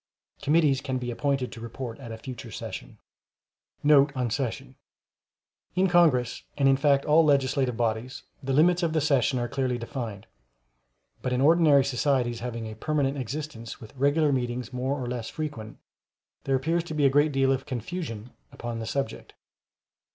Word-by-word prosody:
] - - -35
Committees 145 -3 +3
can 130 -2 -2
be 125 -1 -3
appointed 135 +1 -1
to 115 - -9
report 115 +1 -6
at 120 -4 -8
a 110 - -6
future 125 +2 -8
session. - - -7 0.9
Note 145 -1 +6
On 125 -3 -1
Session—In 135 - -5
Congress, 160 -9 +3 0.2
and 140 -1 +3
in 135 - +6
fact 140 0 +2
all 155 +2 +5
legislative 135 -4 +2
bodies, 115 +2 -2 0.2
the 135 - -3
limits 170 +6 +4
of 165 -2 0
the 160 - +2
sessions 140 -3 +2
are 120 - -1
clearly 130 0 -1
defined; 115 -4 -6 1.0
but 130 - -2
in 125 - +1
ordinary 150 -2 +5
societies 125 -3 0
having 115 -1 -5
a 110 0 -7
permanent 140 +3 0
existence, 130 -2 -6
with 110 +3 -13
regular 145 +3 +2
meetings 125 -1 -2
more 130 +3 -1
or 125 - -3
less 120 -2 -4
frequent, 130 -9 -6 0.7
there 135 - +2
appears 165 +6 0
to 155 - -6
be 145 -2 +2
a - - +7
great 145 +2 +4
deal 135 -1 +2
of 135 +1 -1
confusion 125 - -5 0.2
upon 120 -1 -5
the 110 - -5
subject. 135 -2 -4
135 Hz, 165 wpm, -27 LUFS, 120-145 Hz, 1.0 s, a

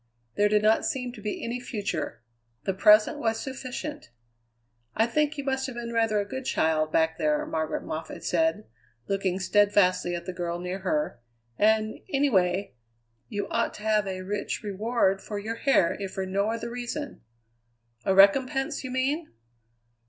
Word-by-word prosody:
There 205 0 +3
did 210 0 +3
not 220 +1 +4
seem 250 -2 -2
to 225 - -11
be 210 0 -4
any 235 +2 -3
future; 205 - -4 0.4
the 195 - 0
present 210 +2 +5
was 225 -1 0
sufficient. 270 +3 -6 0.9
"I 225 - +4
think 300 +5 0
you 280 - -3
must 265 -1 -1
have 260 - -7
been 235 0 -5
rather 225 -2 +2
a 205 - -1
good 260 +5 -5
child, 155 -9 +1
back 160 0 +2
there," 150 -2 +1
Margaret 160 -1 -2
Moffatt 155 +1 -6
said, 320 -10 +1 0.4
looking 195 -2 0
steadfastly 185 -3 +3
at 170 0 -6
the 185 - -4
girl 175 -1 -3
near 180 +2 -4
her; 300 - -1 0.4
"and, 215 0 +2
anyway, 200 -9 +2 0.6
you 205 -1 -3
ought - - 0
to 210 - -10
have 215 -2 +2
a 185 -1 -4
rich 205 +3 -3
reward 205 -1 +1
for 210 - -5
your 220 +3 -4
hair 230 -10 +3
if 195 -1 -3
for 190 - -2
no 200 +3 0
other 230 +1 -3
reason." 245 +4 -5 0.8
"A 190 - +2
recompense, 260 +9 +4
you 260 - -5
mean?" 275 +6 -1
210 Hz, 165 wpm, -27 LUFS, 190-245 Hz, 0.9 s, present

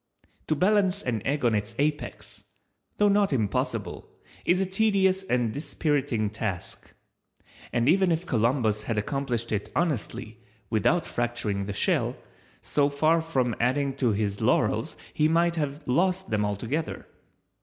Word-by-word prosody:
To 155 - +1
balance 195 +3 +2
an 115 -4 -1
egg 140 -1 0
on 115 - +3
its 105 +2 -2
apex—though 150 +7 -3
not 200 -2 +3
impossible, 110 -7 -2 0.4
is 180 +1 +3
a 190 - +2
tedious 190 -1 +2
and 120 - 0
dispiriting 140 -7 -1
task; 105 -5 -5 0.8
and 120 +1 +1
even 185 +3 +4
if 165 +2 0
Columbus 115 - +1
had 110 0 -3
accomplished 120 +1 -2
it 105 -1 -2
honestly 160 -9 -2 0.3
without - - +2
fracturing 115 -5 -2
the 105 - -3
shell, - - +1 0.5
so 145 -1 +2
far 155 +3 +2
from 130 -8 0
adding 135 +3 +1
to 130 -4 +2
his 100 -1 -1
laurels - - +1 0.2
he 150 - +3
might 170 +1 +2
have 145 -1 -2
lost 185 +5 +1
them 105 -1 +1
altogether. 115 +10 -3
140 Hz, 135 wpm, -27 LUFS, 115-170 Hz, 0.8 s, even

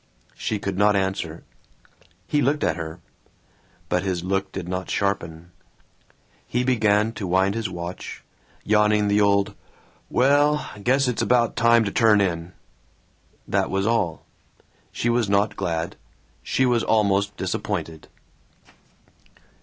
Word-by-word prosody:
She 110 - -3
could 100 -1 -4
not 105 0 +4
answer. 95 -4 -2 0.8
He 145 +6 0
looked 145 +3 +1
at 80 - +1
her. 80 0 -7 0.9
But 90 - 0
his 90 -2 -2
look 95 +1 -1
did 90 -3 -6
not 95 +1 -4
sharpen. 85 -4 -2 1.0
He 125 +1 0
began 110 -3 +2
to 105 -4 -5
wind 95 +2 +2
his 115 -1 -3
watch, 85 0 -7 0.4
yawning 105 0 +3
the 105 +1 +3
old 100 -1 +2 0.6
"Welllllll, 145 -4 +2
guess 135 +3 +3
it's 125 - -1
about 120 -2 +2
time 115 0 +4
to 100 - -2
turn 110 -1 +4
in." 85 -2 -1 0.9
That - - 0
was 95 +1 -1
all. 110 -8 0 0.3
Yet - - -33 0.3
she 120 - -1
was 120 -3 +1
not 100 +1 +2
glad. 80 -1 -3 0.4
She 130 - +1
was 120 -2 +2
almost 100 -2 +1
disappointed. 80 -1 -4
100 Hz, 130 wpm, -23 LUFS, 95-115 Hz, 1.0 s, not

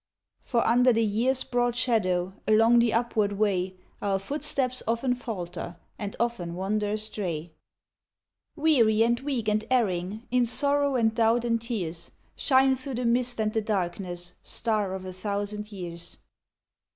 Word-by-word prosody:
For 235 -3 0
under 245 +2 +5
the 230 -1 +2
year's 240 +5 +1
broad 245 -2 0
shadow, 190 -7 +1
Along 225 +2 +5
the 235 -1 +3
upward 220 -3 +1
way, 190 -3 0 0.3
Our 200 -1 +1
footsteps 265 +3 -2
often 235 +3 +1
falter, 180 -8 -6 0.2
And 205 -1 -4
often 190 -8 -2
wander 205 +3 -1
astray. 195 -6 -3 1.0
Weary 235 -9 +4
and 235 +1 +2
weak 260 -5 -3
and 215 0 +1
erring, 210 -4 0
In 250 -1 +3
sorrow 285 +2 +2
and 225 -3 +2
doubt 230 +1 +2
and 230 -1 +1
tears, 175 -8 -3 0.3
Shine 265 -1 +4
through 260 0 -5
the 245 +1 -2
mist 240 0 +1
and 215 0 0
the 220 - +1
darkness 180 -3 -2
Star 210 -4 0
of 190 0 -7
a 185 - -6
thousand 205 +2 -4
years! 170 -4 -7
220 Hz, 145 wpm, -27 LUFS, 195-245 Hz, 1.0 s, under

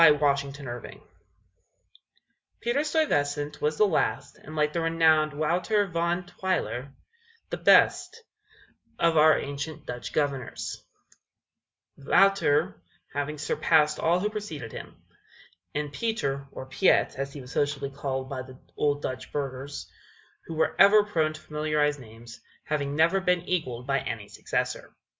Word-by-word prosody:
PETER 155 -3 +8
STUYVESANT 140 -4 -2 1.6
Peter 240 +6 0
Stuyvesant 145 - 0
was 150 +1 0
the 215 - +5
last, 185 -6 0
and, 155 - -11
like 150 0 +1
the 170 - 0
renowned 160 -2 +3
Wouter 175 +8 +1
Van 170 0 -1
Twiller, 180 -8 -2 0.6
the - - -2
best 460 +1 +4 0.7
of 170 -1 +2
our 155 0 +6
ancient 140 +2 -5
Dutch 120 0 -6
Governors, 140 -4 -2 1.1
Wouter 145 - +3 0.3
having 145 +2 -3
surpassed 150 +1 +2
all 170 +2 +2
who 210 +3 -1
preceded 160 - -6
him, - - -9 0.8
and 145 -1 -2
Peter, 140 -10 -2
or 130 - -7
Piet, 135 +8 +3
as 135 0 -4
he 145 - -8
was 125 0 -11
sociably 145 -1 -1
called 135 -1 -3
by 130 -2 -4
the 130 0 -11 0.2
old 145 0 0
Dutch 130 0 -5
burghers, 140 0 -5 0.6
who 165 - -5
were 160 - +1
ever 205 +1 +8
prone 160 -7 0
to 155 - -11
familiarize 150 -1 0
names, 115 -1 -13 0.2
having 145 -2 -2
never 165 +5 +4
been 180 -2 +2
equaled 130 -10 -2
by 135 0 +1
any 110 -3 -5
successor. - - -3
150 Hz, 135 wpm, -27 LUFS, 140-170 Hz, 1.6 s, PETER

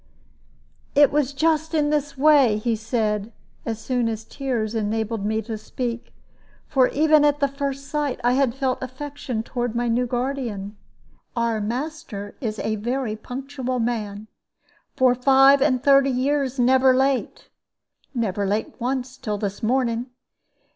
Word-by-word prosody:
"It 290 -1 +6
was 290 -2 +1
just 315 +2 +1
in 295 -1 +2
this 290 -2 -1
way," 275 -6 +5
he 225 +1 0
said, 215 -1 -1 0.4
as 225 -1 -2
soon 245 -1 0
as 220 0 -4
tears 235 -4 -3
had 220 -2 -1
enabled 220 0 -2
me 220 +1 -1
to 220 0 -5
speak 235 +1 -5 0.5
for 260 -3 +3
even 305 0 +4
at 295 0 +3
the 280 - +3
first 275 0 -4
sight 290 -3 -2
I 245 - +3
had 260 -2 +2
felt 265 -2 -1
affection 260 -3 -5
toward 240 -1 -3
my 240 0 0
new 245 +2 +1
guardian. 240 -5 -3 0.6
"Our 230 -2 0
master 240 -3 -5
is 220 -4 -3
a 215 0 -2
very 240 +1 -2
punctual 255 +2 -5
man, 215 -3 -2 0.7
for 260 -3 +4
five 270 +2 +5
and 260 -3 +2
thirty 275 -1 +5
years 270 +1 0
never 260 +1 +4
late 265 0 0 0.7
never 205 -4 -1
late 210 +3 -1
once 255 +1 -3
till 210 -2 -3
this 200 0 -4
morning. 240 0 0
250 Hz, 145 wpm, -23 LUFS, 225-275 Hz, 0.7 s, It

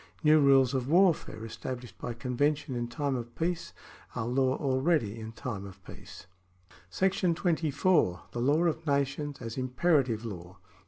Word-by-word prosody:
New 155 0 +6
rules 135 -2 +5
of 130 -2 -1
warfare 175 - +3
estab 115 +3 -5
lished 125 - -12
by 120 - -4
convention 140 +4 -1
in 120 0 -2
time 140 +3 -2
of 120 -1 -6
peace 170 +1 -2 0.4
are 110 - -2
law 130 +2 +1
already 130 -5 0
in 110 0 -7
time 110 -3 -5
of 100 -2 -11
peace. - - -12 0.7
§ 190 -2 +1
24. 160 - +1
The 120 - -4
Law 145 +6 +3
of 160 -1 -1
Nations 140 +1 -1
as 115 +2 -5
Imperative 130 -3 +1
Law. 90 -3 -8
135 Hz, 155 wpm, -29 LUFS, 120-155 Hz, 0.7 s, New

